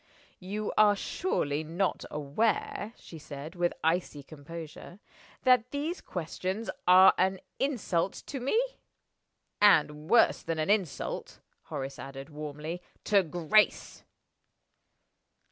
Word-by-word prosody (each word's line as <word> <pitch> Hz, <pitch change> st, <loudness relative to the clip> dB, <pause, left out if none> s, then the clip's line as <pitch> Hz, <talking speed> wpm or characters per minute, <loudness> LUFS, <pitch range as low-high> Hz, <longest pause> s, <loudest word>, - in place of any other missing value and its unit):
"You 205 Hz, +3 st, -4 dB
are 210 Hz, -1 st, +6 dB
surely 155 Hz, -, -1 dB
not 175 Hz, +5 st, -1 dB
aware," 205 Hz, +8 st, -1 dB
she 165 Hz, -, -11 dB
said, 145 Hz, +2 st, -8 dB
with 175 Hz, -1 st, 0 dB
icy 160 Hz, -3 st, 0 dB
composure, 160 Hz, +4 st, -10 dB, 0.5 s
"that 250 Hz, -2 st, +4 dB
these 295 Hz, +6 st, -3 dB
questions 185 Hz, +5 st, -4 dB, 0.2 s
are 185 Hz, +1 st, +8 dB
an 190 Hz, 0 st, +2 dB, 0.2 s
insult 200 Hz, -10 st, 0 dB
to 275 Hz, -, -5 dB
Me?" 275 Hz, -, +1 dB, 1.0 s
"And 150 Hz, -6 st, +4 dB
worse 235 Hz, -, +5 dB
than 165 Hz, -, -3 dB
an 155 Hz, +5 st, +1 dB
insult," 195 Hz, -8 st, -2 dB, 0.3 s
Horace 135 Hz, 0 st, -5 dB
added, 135 Hz, +2 st, -8 dB
warmly, 150 Hz, +3 st, -6 dB, 0.2 s
"to 205 Hz, -2 st, +4 dB
Grace!" 175 Hz, +5 st, +1 dB
175 Hz, 110 wpm, -29 LUFS, 150-210 Hz, 1.0 s, are